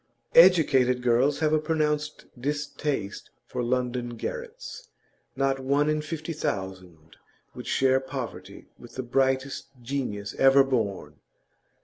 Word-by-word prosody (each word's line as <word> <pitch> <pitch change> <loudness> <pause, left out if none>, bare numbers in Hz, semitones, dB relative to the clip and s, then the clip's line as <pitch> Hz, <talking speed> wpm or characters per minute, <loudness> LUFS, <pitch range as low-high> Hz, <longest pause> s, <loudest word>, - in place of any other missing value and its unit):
Educated 140 -8 +5
girls 125 +4 +3
have 155 -1 +2
a 155 - +4
pronounced 150 -1 -1
distaste 145 -4 -3 0.2
for - - -4
London 125 -1 -2
garrets; 485 - -7 0.5
not 135 0 +1
one 140 +3 +2
in 155 0 0
fifty 155 +1 -5
thousand 95 - -5 0.4
would - - -9
share 130 0 +3
poverty 120 -8 -7
with 120 - -13
the 130 - -3
brightest 130 +2 0 0.2
genius 115 -6 -3
ever 135 +1 +7
born. 115 -8 -2
135 Hz, 115 wpm, -26 LUFS, 120-150 Hz, 0.5 s, ever